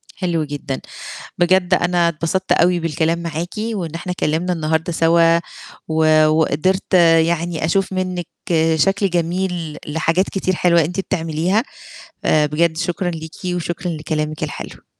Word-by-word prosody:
حلو 170 Hz, -4 st, -1 dB
جدًا، 145 Hz, -2 st, -5 dB, 0.6 s
بجد 180 Hz, +1 st, +3 dB
أنا 175 Hz, -1 st, +2 dB
اتبسطت 170 Hz, +4 st, -1 dB
أوي 175 Hz, 0 st, +3 dB
بالكلام 165 Hz, +1 st, 0 dB
معاكِ 170 Hz, +1 st, -4 dB
وإن 205 Hz, -8 st, -3 dB
إحنا 180 Hz, +2 st, -4 dB
اتكلّمنا 175 Hz, +1 st, -1 dB
النهارده 160 Hz, +1 st, -1 dB
سوا 165 Hz, 0 st, +4 dB, 0.5 s
و 155 Hz, -1 st, +4 dB
وقدرت 160 Hz, +5 st, +1 dB, 0.3 s
يعني 170 Hz, -1 st, -2 dB
أشوف 190 Hz, +4 st, +1 dB
منِّك 185 Hz, -2 st, -2 dB, 0.5 s
شكل 195 Hz, +5 st, +2 dB
جميل 175 Hz, -2 st, -2 dB
لحاجات 165 Hz, +5 st, 0 dB
كتير 185 Hz, -1 st, -1 dB
حلوة 170 Hz, -1 st, +3 dB
أنتِ 180 Hz, +5 st, -2 dB
بتعمليها، 175 Hz, +3 st, 0 dB, 0.6 s
آآ 150 Hz, -1 st, +4 dB
بجد 160 Hz, +2 st, 0 dB
شكرًا 175 Hz, +1 st, -1 dB
ليكِ 160 Hz, -1 st, -8 dB, 0.2 s
وشكرًا 175 Hz, 0 st, -3 dB
لكلامِك 155 Hz, -1 st, -3 dB
الحلو. -, -, -7 dB
170 Hz, 130 wpm, -19 LUFS, 160-180 Hz, 0.6 s, سوا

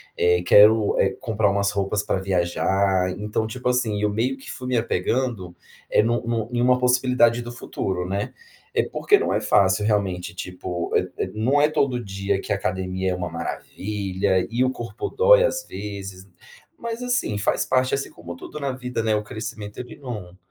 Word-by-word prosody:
eh, 90 Hz, 0 st, +3 dB
quero, 105 Hz, +3 st, +6 dB
eh, 95 Hz, -, +4 dB
comprar 110 Hz, -2 st, +1 dB
umas 100 Hz, 0 st, +1 dB
roupas 100 Hz, +1 st, -1 dB
para -, -, 0 dB
viajar”, 95 Hz, +1 st, +1 dB
então, 105 Hz, +1 st, -2 dB
tipo, 125 Hz, +2 st, -5 dB
assim, 120 Hz, -5 st, +1 dB
eu 105 Hz, 0 st, +1 dB
meio 120 Hz, +6 st, 0 dB
que 135 Hz, -, -9 dB
fui 125 Hz, -, -7 dB
me 125 Hz, -2 st, +1 dB
apegando, 110 Hz, -3 st, -1 dB, 0.3 s
é, -, -, +4 dB
nu 120 Hz, +1 st, +1 dB
nu 115 Hz, -1 st, -1 dB
em 120 Hz, 0 st, 0 dB
uma 125 Hz, +1 st, +4 dB
possibilidade 125 Hz, -1 st, +3 dB
do 120 Hz, -, -7 dB
futuro, 95 Hz, -6 st, -3 dB
né. 100 Hz, +2 st, -2 dB, 0.4 s
É -, -, +2 dB
porque 410 Hz, -, +3 dB
não 425 Hz, -, 0 dB
é -, -, +1 dB
fácil 95 Hz, +1 st, +3 dB
realmente 100 Hz, -3 st, 0 dB
tipo 90 Hz, -2 st, -5 dB
é -, -, 0 dB
é -, -, -8 dB
não 125 Hz, +7 st, +2 dB
é 150 Hz, -, +5 dB
todo 130 Hz, -5 st, 0 dB
dia 100 Hz, -1 st, -2 dB
que -, -, -2 dB
a -, -, +1 dB
academia 95 Hz, -2 st, -2 dB
é 90 Hz, -, -1 dB
uma 90 Hz, -1 st, -4 dB
maravilha 95 Hz, -2 st, -2 dB
e 120 Hz, +3 st, +1 dB
o 130 Hz, -, +2 dB
corpo 120 Hz, -3 st, -5 dB
dói, -, -, +6 dB
às -, -, 0 dB
vezes, 100 Hz, -2 st, -7 dB, 0.5 s
mas 235 Hz, +1 st, -4 dB
assim, 245 Hz, -, 0 dB
faz 100 Hz, -, +1 dB
parte 130 Hz, 0 st, +1 dB
assim 135 Hz, -, -1 dB
como 85 Hz, 0 st, -9 dB
tudo 150 Hz, -, -8 dB
na 140 Hz, -1 st, -1 dB
vida, 125 Hz, -3 st, -4 dB
né, 110 Hz, -1 st, +2 dB
o 105 Hz, 0 st, 0 dB
crescimento 110 Hz, -1 st, -7 dB
ele 125 Hz, -1 st, -8 dB
não 105 Hz, -10 st, -7 dB
105 Hz, 190 wpm, -23 LUFS, 95-125 Hz, 0.5 s, quero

